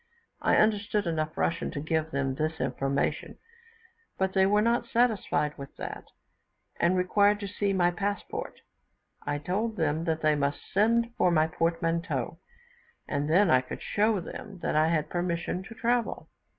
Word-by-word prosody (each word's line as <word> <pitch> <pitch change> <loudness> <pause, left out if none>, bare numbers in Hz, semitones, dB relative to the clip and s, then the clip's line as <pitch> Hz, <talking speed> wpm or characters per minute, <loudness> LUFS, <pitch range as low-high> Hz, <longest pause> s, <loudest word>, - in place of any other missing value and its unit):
I - - +3
understood 210 -1 +2
enough 155 -2 -2
Russian 170 - 0
to 145 - -5
give 160 +1 -1
them 135 -2 -1
this 155 +3 -2
information, 135 +1 -1 0.8
but 190 0 0
they 190 -1 +4
were 210 +1 +3
not 235 +1 +1
satisfied 220 -11 +1
with 140 - -9
that, - - -6 0.7
and 180 +2 +3
required 205 +3 +3
to 200 - -3
see 200 +1 -1
my 175 -2 +3
passport; 200 +3 -4 0.7
I 145 0 0
told 200 +9 -2
them 160 -2 0
that 160 -2 -1
they 155 0 +4
must 140 -1 -2
send 230 +3 +3
for 180 - +4
my 160 -2 +4
portmanteau, 165 +1 -1 0.7
and 145 0 -1
then 180 +2 +4
I 130 0 +5
would - - -6
show 210 0 +2
them 195 +3 -8
that - - 0
I 155 +1 +4
had 155 -2 +1
permission 175 +1 -2
to 225 - -10
travel. 235 +1 -1
175 Hz, 160 wpm, -28 LUFS, 155-205 Hz, 0.8 s, I